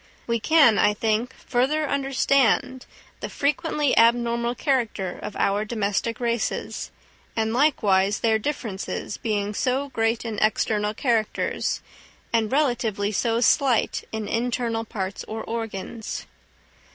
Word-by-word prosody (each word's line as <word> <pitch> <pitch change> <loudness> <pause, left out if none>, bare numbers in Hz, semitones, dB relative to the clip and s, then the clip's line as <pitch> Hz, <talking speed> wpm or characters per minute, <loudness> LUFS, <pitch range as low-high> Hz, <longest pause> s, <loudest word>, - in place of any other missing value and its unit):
We 235 0 0
can, 280 -4 +5
I 210 - +4
think, 220 +3 0
further 290 +5 0
understand 270 -2 +1 0.3
the - - -5
frequently 295 0 0
abnormal 235 +1 +3
character 230 - -1
of - - -6
our 200 +1 +1
domestic 215 0 -1
races, 235 -2 -2 0.5
and 220 0 0
likewise 205 -8 +2
their 220 -1 +3
differences 215 -7 -4
being 210 -2 -2
so 265 +6 0
great 225 -1 0
in 220 -3 -3
external 215 0 +1
characters, 230 -4 -1 0.5
and 225 -2 +1
relatively 240 -8 +1
so 230 +3 0
slight 250 -1 +2
in 220 -1 -4
internal 235 -1 -1
parts 195 -2 -4
or 220 0 -5
organs. 225 -1 -5
230 Hz, 115 wpm, -24 LUFS, 215-255 Hz, 0.5 s, can